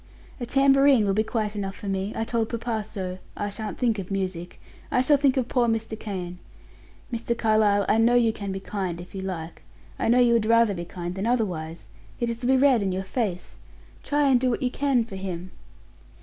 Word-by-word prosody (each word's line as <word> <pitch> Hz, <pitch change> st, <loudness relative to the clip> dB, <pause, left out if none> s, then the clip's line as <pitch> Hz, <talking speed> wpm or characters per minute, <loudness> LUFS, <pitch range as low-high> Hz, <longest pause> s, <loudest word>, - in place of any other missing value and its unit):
"A 240 Hz, -, -4 dB
tambourine 275 Hz, -3 st, +5 dB
will 195 Hz, -, +1 dB
be 215 Hz, -, +2 dB
quite 220 Hz, -1 st, -2 dB
enough 195 Hz, -1 st, -3 dB
for 210 Hz, -, -8 dB
me; 195 Hz, +1 st, -2 dB
I 225 Hz, -, -1 dB
told 225 Hz, -1 st, -1 dB
papa 230 Hz, -2 st, -2 dB
so, 190 Hz, -3 st, -5 dB, 0.2 s
I 205 Hz, 0 st, -2 dB
shan't 215 Hz, +1 st, -5 dB
think 230 Hz, -4 st, +1 dB
of 185 Hz, -, -6 dB
music; 185 Hz, -3 st, -4 dB, 0.3 s
I -, -, +1 dB
shall 290 Hz, +3 st, +4 dB
think 275 Hz, -1 st, +2 dB
of 250 Hz, -2 st, +1 dB
poor 245 Hz, -2 st, +2 dB
Mr. 225 Hz, -1 st, -1 dB
Kane. 180 Hz, -4 st, -5 dB, 0.7 s
Mr. 235 Hz, 0 st, -2 dB
Carlyle 215 Hz, -3 st, +3 dB
I 220 Hz, -, +3 dB
know 235 Hz, +2 st, +4 dB
you 230 Hz, -2 st, +4 dB
can 200 Hz, -2 st, -5 dB
be 190 Hz, -, -4 dB
kind 190 Hz, -3 st, -4 dB
if 175 Hz, +1 st, -11 dB
you 195 Hz, -, -5 dB
like; 175 Hz, -4 st, -6 dB, 0.4 s
I -, -, 0 dB
know 235 Hz, +2 st, +4 dB
you 245 Hz, -1 st, +5 dB
would 225 Hz, -2 st, +2 dB
rather 230 Hz, -2 st, +4 dB
be 175 Hz, -2 st, -5 dB
kind 175 Hz, 0 st, -6 dB
than 195 Hz, +4 st, -3 dB
otherwise 170 Hz, -, -2 dB, 0.3 s
it 235 Hz, -1 st, 0 dB
is 230 Hz, -, -5 dB
to 245 Hz, -, -2 dB
be 265 Hz, 0 st, +4 dB
read 260 Hz, -4 st, +4 dB
in 195 Hz, -1 st, 0 dB
your 190 Hz, +1 st, -2 dB
face. 190 Hz, -4 st, -3 dB, 0.4 s
Try 290 Hz, 0 st, +1 dB
and 260 Hz, -2 st, +5 dB
do 255 Hz, -, +2 dB
what 240 Hz, -, -1 dB
you 250 Hz, -, 0 dB
can 270 Hz, -4 st, +1 dB
for 205 Hz, -4 st, -8 dB
him." 185 Hz, -1 st, -5 dB
215 Hz, 220 wpm, -25 LUFS, 190-240 Hz, 0.7 s, tambourine